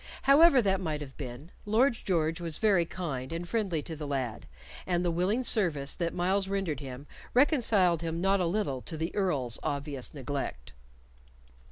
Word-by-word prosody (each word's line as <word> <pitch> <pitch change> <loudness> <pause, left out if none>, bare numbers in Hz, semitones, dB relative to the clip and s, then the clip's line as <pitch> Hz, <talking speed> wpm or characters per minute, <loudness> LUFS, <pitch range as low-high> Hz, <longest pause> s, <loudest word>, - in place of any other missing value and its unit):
However 275 -1 +6
that 195 -1 +1
might 155 -4 -3
have 135 -2 -8
been, 135 +4 -8
Lord 235 +6 +3
George 165 -5 -1
was 165 -2 -1
very 195 -6 +3
kind 140 -9 -5
and 170 +1 -4
friendly 190 -8 -1
to 160 - -6
the 150 -1 -6
lad, 130 -5 -3 0.4
and 175 -1 0
the 175 - +2
willing 190 +9 0
service 165 - +1
that 170 -1 -2
Myles 190 +2 0
rendered 195 -6 -2
him 135 -1 -8 0.3
reconciled 220 - +3
him 165 0 -3
not 195 +2 +2
a 180 - +1
little 165 -9 -1
to 160 - -4
the 160 +2 -3
Earl's 145 - +1
obvious 140 -2 -3
neglect. 135 - -5
170 Hz, 170 wpm, -29 LUFS, 145-195 Hz, 0.4 s, However